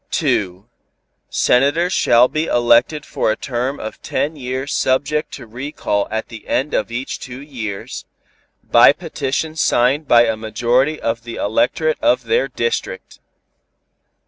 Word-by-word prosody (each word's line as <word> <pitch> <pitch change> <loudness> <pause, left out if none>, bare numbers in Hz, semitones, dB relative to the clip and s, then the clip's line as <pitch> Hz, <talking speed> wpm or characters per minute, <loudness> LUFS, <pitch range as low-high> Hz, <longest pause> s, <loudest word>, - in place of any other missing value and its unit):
2. 95 +1 -1 0.6
Senators 150 +8 +2
shall 120 +2 +4
be 155 +4 -2
elected 120 +4 +2
for - - 0
a - - 0
term 130 +3 -3
of 110 - -7
ten 155 +2 -2
years 130 0 -4
subject 145 +4 0
to - - -9
recall 115 -3 -3
at 110 +1 -4
the 110 -2 -11
end 140 +4 -1
of 110 - 0
each 125 +3 -4
two 125 0 -8
years, 115 -9 -6 0.6
by 120 +2 +6
petition 155 -1 -3
signed 140 0 +2
by 120 -1 +6
a - - 0
majority 120 +7 0
of 115 0 -2
the 120 -1 -7
electorate 475 +11 0
of - - +2
their 470 +2 +1
district. 465 +1 -4
130 Hz, 140 wpm, -19 LUFS, 115-150 Hz, 0.6 s, by